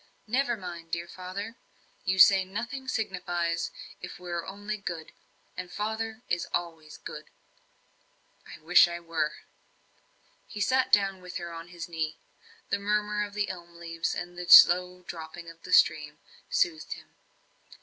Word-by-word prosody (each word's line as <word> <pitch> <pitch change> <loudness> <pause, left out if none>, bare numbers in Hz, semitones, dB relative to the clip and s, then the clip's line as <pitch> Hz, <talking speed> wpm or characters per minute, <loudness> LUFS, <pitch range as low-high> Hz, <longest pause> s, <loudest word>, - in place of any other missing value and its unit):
"Never 240 +1 +1
mind, 170 -3 -8
dear 170 +1 -3
father. 190 +6 -7 0.5
You 190 0 +1
say 195 0 +8
nothing 235 +8 -5
signifies, 175 -7 -1 0.3
if - - -7
we 180 -1 -8
are 170 -1 -3
only 205 +2 -5
good. 170 -6 -6 0.4
And 180 -1 -6
father 220 +2 -3
is 175 -1 -1
always 165 -3 -4
good." - - -8 1.2
"I - - -10
wish 175 +3 +7
I 170 0 -5
were." 165 -3 -1 1.1
He 210 - -8
sat 260 +5 +2
down 195 -2 +3
with 180 0 -6
her 170 -1 -6
on 165 +1 -8
his 175 -1 -7
knee; 160 -2 -3 0.5
the 200 - +1
murmur 210 +1 0
of 205 0 -7
the 210 -1 0
elm 175 -2 -8
leaves, 165 -1 -3
and 175 0 -5
the 180 - -6
slow 180 +1 +8
dropping 165 0 -8
of 165 0 -19
the - - -9
stream, - - +4 0.3
soothed 350 -11 0
him. - - -14
180 Hz, 150 wpm, -28 LUFS, 170-210 Hz, 1.2 s, say